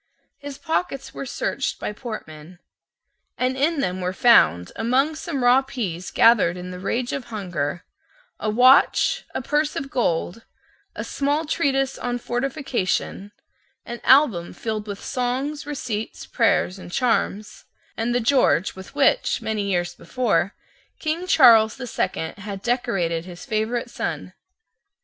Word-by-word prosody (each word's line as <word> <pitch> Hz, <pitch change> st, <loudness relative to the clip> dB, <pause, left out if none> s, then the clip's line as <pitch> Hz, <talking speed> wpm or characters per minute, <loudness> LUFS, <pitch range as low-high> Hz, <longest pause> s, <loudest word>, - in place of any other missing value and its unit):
His 285 Hz, -1 st, -8 dB
pockets 320 Hz, -3 st, -3 dB
were 275 Hz, -, -6 dB
searched -, -, -2 dB
by -, -, -4 dB
Portman, 180 Hz, -, -8 dB, 0.8 s
and 255 Hz, +1 st, 0 dB
in 290 Hz, +3 st, +1 dB
them 185 Hz, -3 st, -2 dB
were 180 Hz, +1 st, -2 dB
found, 90 Hz, -, +4 dB
among 260 Hz, +7 st, +1 dB
some 310 Hz, -4 st, -4 dB
raw 245 Hz, +2 st, +6 dB
pease 200 Hz, -10 st, -5 dB
gathered 220 Hz, -7 st, +4 dB
in 180 Hz, 0 st, -7 dB
the 180 Hz, -, -7 dB
rage 240 Hz, +6 st, -2 dB
of 275 Hz, -4 st, -4 dB
hunger, 175 Hz, -8 st, -4 dB, 0.6 s
a 215 Hz, -, -1 dB
watch, 250 Hz, +5 st, +4 dB
a -, -, -2 dB
purse 295 Hz, +2 st, 0 dB
of 275 Hz, +1 st, -5 dB
gold, 225 Hz, -, -1 dB, 0.5 s
a -, -, -4 dB
small 290 Hz, +3 st, -1 dB
treatise 270 Hz, -3 st, 0 dB
on 245 Hz, 0 st, -2 dB
fortification, 240 Hz, -6 st, -2 dB, 0.5 s
an 240 Hz, 0 st, -7 dB
album 245 Hz, -, +4 dB
filled 215 Hz, -2 st, -4 dB
with 200 Hz, -1 st, -6 dB
songs, 265 Hz, +4 st, -2 dB
receipts, 230 Hz, -7 st, -4 dB
prayers, 185 Hz, +2 st, +1 dB
and 175 Hz, -, -10 dB
charms, 215 Hz, -3 st, -1 dB, 0.3 s
and 235 Hz, +2 st, -1 dB
the -, -, +3 dB
George 245 Hz, -7 st, +2 dB
with 190 Hz, +7 st, -11 dB
which, 285 Hz, -, +2 dB
many 220 Hz, -1 st, -2 dB
years 175 Hz, -2 st, -1 dB
before, 215 Hz, -7 st, -1 dB, 0.4 s
King 330 Hz, +3 st, -3 dB
Charles 230 Hz, -10 st, +6 dB
the 260 Hz, -, -6 dB
Second 160 Hz, -6 st, -3 dB
had 200 Hz, -1 st, -7 dB
decorated 195 Hz, -10 st, -1 dB
his 180 Hz, -1 st, -10 dB
favourite 220 Hz, +2 st, -2 dB
son. -, -, -4 dB
235 Hz, 140 wpm, -23 LUFS, 190-270 Hz, 0.8 s, raw